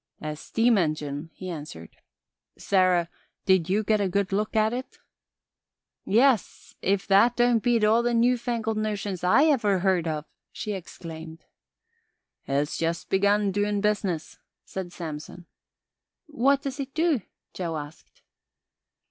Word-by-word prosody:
"A 155 0 -4
steam 225 +7 +2
engyne," 150 -2 -2
he 185 - -9
answered. 145 - -8 0.6
"Sarah, 185 -3 +2 0.4
did 190 -3 +3
ye 205 +3 +2
get 215 0 +2
a 195 - +1
good 200 +1 0
look 210 +3 -1
at 220 +1 +3
it?" 255 +2 -6 1.1
"Yes; 235 +1 +2
if 195 0 +1
that 205 +5 +4
don't 240 -2 +3
beat 235 -2 +2
all 220 +2 +4
the 240 0 0
newfangled 235 -2 +1
notions 205 -4 -3
I 185 +11 +5
ever 230 -11 +3
heard 180 -2 +1
of," 155 -1 -3 0.3
she 215 - -5
exclaimed. 165 -4 -8 1.0
"It's 140 +2 -1
just 165 0 -2
begun 200 +1 +3
doin' 205 +1 0
business," 200 -6 -1 0.3
said 185 -2 -6
Samson. 165 +1 -7 0.8
"What 280 -1 +1
does 275 0 -4
it 270 0 -5
do?" 320 -6 +2 0.3
Joe 170 -3 -3
asked. 145 +1 -11
200 Hz, 130 wpm, -26 LUFS, 170-230 Hz, 1.1 s, I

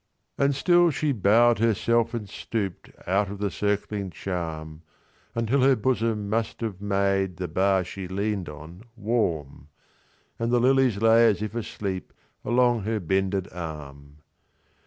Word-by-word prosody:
And 140 0 +2
still 175 +3 +4
she 150 0 0
bow'd 115 +1 +4
herself 115 +1 +2
and 110 -3 -4
stoop'dOut 100 -1 -3
of 100 - -6
the 100 -1 -2
circling 100 +3 -2
charm; 80 -4 -5 0.5
Until 115 +4 +1
her 135 +1 +5
bosom 115 -3 0
must 110 +2 -2
have 110 -5 -3
madeThe 95 -4 -1
bar 95 0 +3
she 95 +1 -7
lean'd 100 -1 -2
on 80 +5 -11
warm, 90 - -2 0.7
And 115 +1 -1
the 120 - +4
lilies 130 -3 +3
lay 115 +1 +6
as 105 -1 +1
if 110 - -3
asleepAlong 115 +3 -2
her 110 +1 -1
bended 95 +1 0
arm. 75 -4 -8
100 Hz, 130 wpm, -25 LUFS, 95-115 Hz, 0.7 s, lay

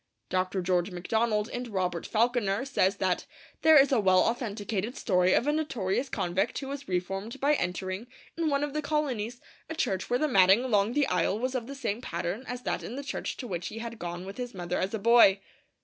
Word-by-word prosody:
Dr. 185 0 0
George 180 +1 +1
MacDonald, 210 +4 0
in 245 -2 -5
Robert 180 -3 -2
Falconer, 230 -1 +1
says 200 -8 +2
that 185 -2 0 0.3
'there 315 -1 +7
is 275 0 +6
a 260 - +4
well 185 -2 +4
authenticated 225 -1 -2
story 180 -2 +2
of - - +2
a 295 - +2
notorious 265 -6 -1
convict 185 +2 -1
who 270 - -5
was 280 0 -6
reformed 195 +7 -3
by 285 +3 +3
entering, 185 0 -2 0.3
in 330 -2 0
one 280 0 +1
of 295 -1 -3
the 305 - -1
colonies, 260 -6 -2 0.3
a 320 - -4
church 190 - -1
where 245 - +2
the 305 - +1
matting 195 -2 +5
along 215 -3 +2
the 290 +1 +3
aisle 180 +1 +1
was 255 +3 -2
of 245 -3 -3
the 275 - -7
same 235 -4 -3
pattern 175 +2 -3
as 250 0 -5
that - - -2
in 240 - -6
the 280 - -5
church 275 - -4
to 250 - -6
which 175 -3 -4
he 220 - -7
had 230 0 -6
gone 175 +1 -5
with 195 +1 -8
his 245 -2 -5
mother 175 -1 -2
as 190 +4 -1
a - - -1
boy.' 220 -2 +6
220 Hz, 215 wpm, -28 LUFS, 185-255 Hz, 0.3 s, there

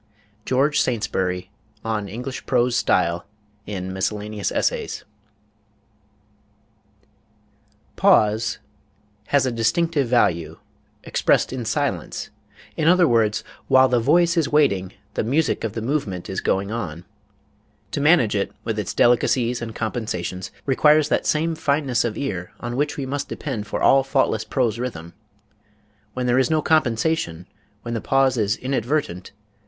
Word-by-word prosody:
GEORGE 140 +3 +2
SAINTSBURY, 95 -6 -2 0.3
on 105 -3 -2
English 125 +5 -6
Prose 125 -1 +2
Style, 85 -5 +1 0.4
in 95 -2 -4
Miscellaneous 105 +2 -2
Essays.... - - -2 2.9
pause... 110 +1 +3 0.7
has 140 -2 +3
a 130 - 0
distinctive 135 +6 +1
value, 85 -9 +1 0.5
expressed - - +1
in 125 -3 -4
silence; 115 - -2 0.4
in 155 - 0
other 180 0 +5
words, 110 -4 +2 0.2
while 130 0 +6
the 125 -1 +2
voice 170 +8 +3
is 160 -4 +1
waiting, 100 -12 +2 0.2
the - - -1
music 140 +6 0
of 110 -3 -2
the 115 - -4
movement 110 - -2
is 95 - -3
going 100 +2 0
on... 90 -7 -5 0.9
To - - -2
manage 145 -9 +4
it, 100 - -1
with 110 -2 -2
its 105 - -4
delicacies 120 0 +2
and 115 -1 -6
compensations, 95 -6 -3 0.2
requires 150 +2 +4
that - - 0
same 160 +2 +1
fineness 145 -5 0
of 115 -3 -3
ear 90 -11 -4
on 120 0 -4
which 145 +2 -1
we 140 - -3
must 140 +2 -4
depend 115 -8 -4
for - - -3
all 135 - +6
faultless 135 -5 0
prose 115 -1 0
rhythm. 85 -10 -5 1.0
When 125 -1 -2
there 125 +1 +3
is 130 - +2
no 155 -1 +1
compensation, 120 - +1 0.4
when 120 - -4
the 115 - -2
pause 135 -1 +2
is 105 -3 0
inadvertent 130 - -2
120 Hz, 135 wpm, -22 LUFS, 105-140 Hz, 2.9 s, while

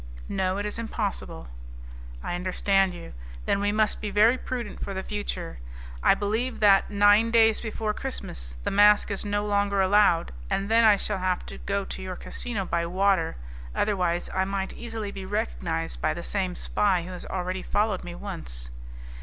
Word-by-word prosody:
"No, 190 0 0
it 205 - -2
is 210 +2 -3
impossible." 205 - -4 0.8
"I - - -3
understand 190 +2 +2
you. 170 - -10 0.3
Then 200 - +1
we 205 0 +1
must 215 0 +1
be 210 - -2
very 215 +5 +5
prudent 245 -4 -5
for 195 - -4
the 190 - -3
future. 205 - -4 0.4
I - - +5
believe 225 +5 -1
that, 200 -2 +5
nine 205 +2 +5
days 225 -1 +4
before 220 -1 -2
Christmas, 60 - -5
the - - -1
mask 205 +1 +5
is 200 - -2
no 205 0 -1
longer 200 -1 +1
allowed, 190 -3 +4 0.2
and 195 +1 -1
then 230 +1 +6
I 215 -2 +7
shall 200 0 -1
have 185 -1 -1
to - - -9
go 200 0 -2
to - - -4
your 185 -1 -5
casino 215 -2 -4
by 170 -1 -1
water, 185 - +1 0.4
otherwise, 180 -4 0
I 190 - +2
might 195 0 -3
easily 225 -3 -5
be 195 -1 -7
recognized 60 - -3
by - - +1
the 170 - -6
same 185 -2 -2
spy 190 -3 +1
who 180 - -8
has 180 - -5
already 185 0 -3
followed 205 -1 0
me 175 -1 -7
once." - - -6
200 Hz, 180 wpm, -26 LUFS, 185-210 Hz, 0.8 s, I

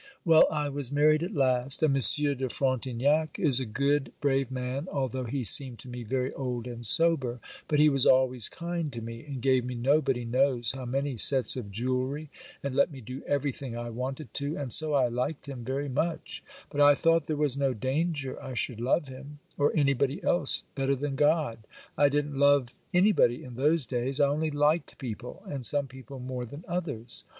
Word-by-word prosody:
'Well, 165 -2 +6
I 150 -1 -2
was 140 -2 0
married 155 +2 +3
at 180 +5 -4
last, 130 +1 +1
and 150 -3 +3
Monsieur 140 +2 +5
de 130 -1 -4
Frontignac 135 +4 0
is 135 -5 +4
a 130 - -4
good, 140 +5 0
brave 135 -2 0
man, 130 +4 -4
although 130 -2 -3
he 130 +2 -3
seemed 125 +1 +3
to - - -14
me 125 0 -7
very 130 +3 -2
old 125 -3 -4
and 120 -1 -8
sober; 130 -2 +4 0.3
but 150 - 0
he 150 - +6
was 135 -3 +2
always 130 -3 +3
kind 170 -3 -4
to 115 - -6
me, 115 0 -8
and 140 -4 -8
gave 130 -2 +3
me 125 0 -5
nobody 130 0 +1
knows 125 0 +2
how 130 -1 -7
many 135 +1 -2
sets 130 +3 +5
of 115 -6 -7
jewelry, 130 +7 -3 0.3
and 140 -1 -3
let 140 +5 +2
me 135 - -10
do 125 +3 -8
everything 140 -3 -3
I 120 0 -5
wanted 130 +4 -6
to, 145 +2 -3
and 140 -5 -5
so 155 -2 +4
I 130 -3 +3
liked 125 +6 -3
him 135 -4 -8
very 135 +4 -3
much; 155 +5 -3 0.3
but 145 - -1
I 145 0 +7
thought 165 0 +2
there 155 - -2
was 145 -3 0
no 140 -2 0
danger 140 +3 -2
I 130 -1 -7
should 115 -1 -2
love 135 +5 0
him, 135 +3 -11 0.2
or 145 0 +2
anybody 140 +2 0
else 170 -6 0
better 135 0 0
than 140 +1 -4
God. 145 -5 +1 0.4
I 145 - +4
didn't 145 -1 -2
love 140 -3 +2
anybody 180 - +3
in 125 - -10
those 145 +4 +1
days, 130 +3 -2
I 140 -1 +4
only 155 +2 -1
liked 150 +3 0
people, 125 - -8
and 140 -9 -6
some 140 +4 +4
people 130 +1 -11
more 125 0 -5
than 145 +8 -11
others. 145 -10 -5
135 Hz, 195 wpm, -28 LUFS, 125-145 Hz, 0.4 s, I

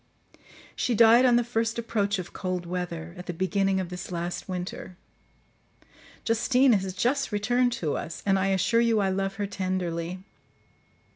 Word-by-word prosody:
She 240 - 0
died 230 +3 +7
on 245 - +5
the 240 - +3
first 230 -1 -1
approach 210 -3 -1
of 180 -1 -7
cold 185 -2 -3
weather, 170 -2 -5
at 180 - -9
the 175 - -4
beginning 195 +1 +1
of 185 -2 -3
this 180 +1 -7
last 175 +2 -4
winter. 180 0 -6 1.3
Justine 245 +3 +3
has 190 -2 0
just 250 +8 0
returned 245 +4 +1
to 165 -11 -2
us; 165 - -6
and 195 -1 +3
I 190 - +1
assure 195 +5 +2
you 230 -2 +3
I 195 -1 +1
love 195 +1 -2
her 205 - -2
tenderly. 185 -2 -3
195 Hz, 160 wpm, -27 LUFS, 180-230 Hz, 1.3 s, died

